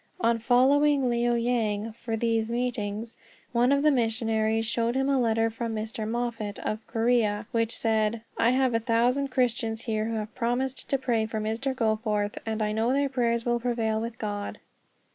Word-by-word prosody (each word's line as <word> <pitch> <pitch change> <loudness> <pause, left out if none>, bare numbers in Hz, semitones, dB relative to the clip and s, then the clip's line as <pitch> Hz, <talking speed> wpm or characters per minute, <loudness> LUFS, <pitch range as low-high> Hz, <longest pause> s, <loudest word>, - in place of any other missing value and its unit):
On 230 -7 +2
reaching 265 +3 +3
Liao 240 0 +1
Yang 230 -3 0
for 225 0 -4
these 225 -1 0
meetings, 230 -2 -3 0.3
one 245 +2 +3
of 280 0 +3
the 305 - +5
missionaries 225 -2 +1
showed 230 +2 0
him 270 0 +1
a 275 -1 +2
letter 225 -1 +2
from 225 0 -4
Mr. 215 0 -4
Moffat, 230 -3 -3
of 215 +1 -4
Korea, 225 -2 +1
which 230 0 0
said: 220 0 0
"I 230 - +3
have 255 0 +2
a 230 - +2
thousand 240 +4 +1
Christians 235 -3 -1
here 215 -2 -1
who 225 0 -2
have 215 0 -4
promised 255 +2 -2
to 275 - +2
pray 235 -4 0
for 220 0 -3
Mr. 225 +5 -2
Goforth, 215 -3 0
and 220 0 -1
I 210 - 0
know 220 +3 +1
their 280 0 +1
prayers 235 -3 0
will 240 0 +1
prevail 230 -2 0
with 230 0 -5
God." 205 -2 -4
230 Hz, 180 wpm, -27 LUFS, 220-245 Hz, 0.3 s, the